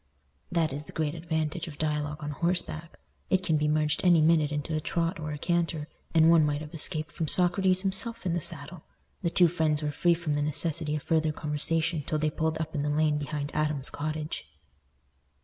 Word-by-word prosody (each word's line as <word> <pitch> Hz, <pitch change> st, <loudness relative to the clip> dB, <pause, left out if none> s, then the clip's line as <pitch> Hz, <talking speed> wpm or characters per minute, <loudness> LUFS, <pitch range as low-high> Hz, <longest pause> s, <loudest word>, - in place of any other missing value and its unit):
That 165 Hz, -5 st, +1 dB
is 145 Hz, +2 st, -6 dB
the -, -, -11 dB
great 155 Hz, -2 st, -1 dB
advantage 165 Hz, 0 st, -2 dB
of 150 Hz, -3 st, -9 dB
dialogue 150 Hz, -1 st, -2 dB
on 150 Hz, -, -3 dB
horseback; 170 Hz, 0 st, -2 dB, 0.3 s
it 190 Hz, 0 st, +2 dB
can 160 Hz, -, +1 dB
be 150 Hz, 0 st, +1 dB
merged 150 Hz, 0 st, +1 dB
any 175 Hz, -3 st, +6 dB
minute 155 Hz, -1 st, +3 dB
into 150 Hz, +2 st, -3 dB
a 155 Hz, -, -1 dB
trot 165 Hz, +2 st, -1 dB
or 155 Hz, -1 st, -4 dB
a 150 Hz, -, -4 dB
canter, 165 Hz, -1 st, -1 dB, 0.3 s
and 160 Hz, 0 st, +6 dB
one 165 Hz, -1 st, +6 dB
might 150 Hz, 0 st, 0 dB
have 150 Hz, -1 st, -9 dB
escaped 155 Hz, -1 st, -2 dB
from 160 Hz, -, -3 dB
Socrates 185 Hz, +2 st, +4 dB
himself 200 Hz, +4 st, -1 dB
in 175 Hz, -, 0 dB
the 175 Hz, -, -1 dB
saddle. 155 Hz, +2 st, -2 dB, 0.4 s
The 170 Hz, -, +1 dB
two 175 Hz, +1 st, +5 dB
friends 155 Hz, -3 st, 0 dB
were 150 Hz, -, -1 dB
free 170 Hz, +3 st, +3 dB
from 165 Hz, -3 st, -2 dB
the 145 Hz, -, 0 dB
necessity 150 Hz, +1 st, -2 dB
of 150 Hz, -, -4 dB
further 160 Hz, -1 st, +1 dB
conversation 155 Hz, +2 st, 0 dB
till 155 Hz, +2 st, -2 dB
they 155 Hz, 0 st, 0 dB
pulled 160 Hz, 0 st, -1 dB
up 160 Hz, 0 st, -4 dB
in 150 Hz, -, -1 dB
the 150 Hz, -, -1 dB
lane 150 Hz, 0 st, +2 dB
behind 145 Hz, 0 st, -4 dB
Adam's 150 Hz, -3 st, +1 dB
cottage. 155 Hz, -, -4 dB
155 Hz, 205 wpm, -28 LUFS, 150-170 Hz, 0.4 s, any